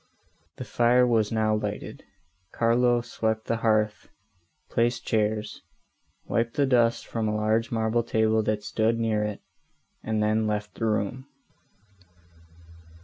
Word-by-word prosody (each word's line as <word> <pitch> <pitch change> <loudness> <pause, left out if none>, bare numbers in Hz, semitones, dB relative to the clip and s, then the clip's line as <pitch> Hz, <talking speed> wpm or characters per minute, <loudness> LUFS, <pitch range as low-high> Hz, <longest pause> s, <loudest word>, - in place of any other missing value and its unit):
The - - -5
fire 120 +1 +3
was 110 -4 +1
now 110 -1 +1
lighted; 105 -1 -4 0.5
Carlo 120 +1 +2
swept 110 -2 -2
the 115 - -1
hearth, 110 -2 0 0.6
placed 120 0 0
chairs, 105 -1 -1 0.6
wiped 115 0 -1
the 145 -2 +2
dust 120 -3 +2
from 115 -2 -3
a 105 - -1
large 110 +2 0
marble 115 0 +1
table 110 -1 +1
that 105 -1 -2
stood 110 +2 0
near 110 -2 0
it, 105 -1 -4 0.6
and 110 -1 -1
then 110 +1 +1
left 105 -1 -3
the 115 - -3
room. 110 +5 -2
110 Hz, 130 wpm, -26 LUFS, 105-115 Hz, 0.6 s, fire